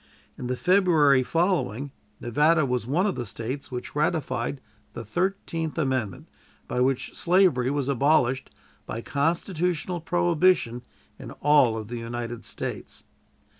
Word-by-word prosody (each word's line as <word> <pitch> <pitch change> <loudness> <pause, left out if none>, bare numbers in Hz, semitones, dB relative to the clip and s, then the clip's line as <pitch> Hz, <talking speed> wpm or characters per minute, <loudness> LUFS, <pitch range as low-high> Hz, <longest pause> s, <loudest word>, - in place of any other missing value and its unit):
In 125 - -6
the 125 0 -2
February 170 -7 +4
following 145 - 0 0.3
Nevada 150 +6 +3
was 125 -3 -2
one 165 +9 +1
of 205 - +1
the - - -4
States 115 +5 -5
which 125 +2 -6
ratified 150 -2 -1 0.3
the 115 - -7
Thirteenth 165 - -2
Amendment, 130 - -2 0.4
by - - -2
which 130 +1 0
slavery 170 -9 +3
was 140 -1 -1
abolished 135 -1 +2 0.4
by 115 - -4
constitutional 170 +4 -1
prohibition 175 -7 +2 0.4
in - - -8
all 140 -6 +3
of 110 -1 -6
the 120 +1 -5
United 120 0 -5
States. - - -6
140 Hz, 130 wpm, -25 LUFS, 125-170 Hz, 0.4 s, February